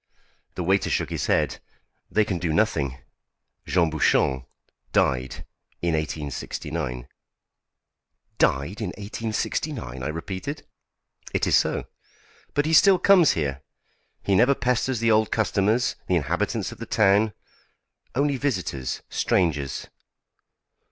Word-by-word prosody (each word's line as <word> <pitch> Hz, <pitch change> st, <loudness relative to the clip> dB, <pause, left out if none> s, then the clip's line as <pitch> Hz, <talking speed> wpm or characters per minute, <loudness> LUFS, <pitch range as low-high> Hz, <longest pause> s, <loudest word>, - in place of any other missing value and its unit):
The 90 Hz, -, -3 dB
waiter 95 Hz, +3 st, +2 dB
shook -, -, -1 dB
his -, -, -2 dB
head. -, -, +1 dB, 0.5 s
"They 110 Hz, 0 st, +2 dB
can 95 Hz, -4 st, -2 dB
do 85 Hz, -1 st, -1 dB
nothing. 75 Hz, -, +1 dB, 0.7 s
Jean 85 Hz, -3 st, +2 dB
Bouchon 65 Hz, -4 st, +2 dB, 0.4 s
died 65 Hz, -1 st, 0 dB, 0.3 s
in 85 Hz, -1 st, 0 dB
1869." 75 Hz, -3 st, -4 dB, 1.3 s
"Died 75 Hz, +11 st, +1 dB
in 105 Hz, -, -1 dB
1869!" 110 Hz, -, -3 dB
I 65 Hz, -, -3 dB
repeated. 95 Hz, -, -5 dB, 0.7 s
"It -, -, +2 dB
is -, -, +3 dB
so. -, -, +1 dB, 0.7 s
But 145 Hz, -, +2 dB
he 160 Hz, -, 0 dB
still 195 Hz, +3 st, +7 dB
comes 180 Hz, -4 st, +5 dB
here. 70 Hz, -4 st, -2 dB, 0.6 s
He 100 Hz, -, +1 dB
never 125 Hz, +8 st, +5 dB
pesters 125 Hz, -1 st, 0 dB
the 115 Hz, 0 st, +3 dB
old 110 Hz, 0 st, +3 dB
customers, 110 Hz, +2 st, +1 dB
the 90 Hz, -, +2 dB
inhabitants 75 Hz, -5 st, -1 dB
of -, -, -11 dB
the -, -, -6 dB
town 105 Hz, +1 st, +3 dB, 0.8 s
only 140 Hz, +1 st, +1 dB
visitors, 90 Hz, -, -2 dB
strangers." 75 Hz, -7 st, 0 dB
95 Hz, 120 wpm, -25 LUFS, 75-115 Hz, 1.3 s, still